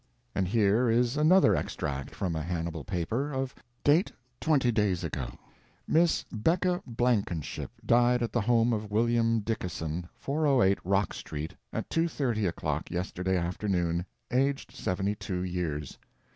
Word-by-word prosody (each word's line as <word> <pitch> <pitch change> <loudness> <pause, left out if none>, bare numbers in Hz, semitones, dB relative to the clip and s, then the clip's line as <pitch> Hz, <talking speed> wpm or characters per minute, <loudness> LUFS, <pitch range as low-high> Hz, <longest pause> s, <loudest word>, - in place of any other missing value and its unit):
And 95 - 0
here 110 +4 +3
is 120 +2 +2
another 160 +6 +5
extract 70 -2 -3
from 95 -4 -2
a 80 - -1
Hannibal 85 -1 -3
paper, 100 - -2
of 135 -1 -2 0.3
date 155 +6 +4 0.3
twenty 140 -6 +3
days 105 -5 +1
ago: 65 -7 -4 0.5
Miss 165 +1 +3
Becca 175 - +1
Blankenship 115 - -1 0.2
died 120 +1 +4
at 115 - -2
the 120 - +1
home 115 +2 +3
of 105 -1 -3
William 115 +1 +2
Dickason, 90 -6 -3
408 135 -9 +2
Rock 100 +2 +1
Street, 75 +3 -6 0.2
at - - -3
2.30 135 - +1
o'clock 85 - -2
yesterday 90 +1 -1
afternoon, 85 -1 0 0.3
aged 135 +2 +1
72 95 -1 -2
years. 85 -5 -3
105 Hz, 130 wpm, -29 LUFS, 90-125 Hz, 0.5 s, another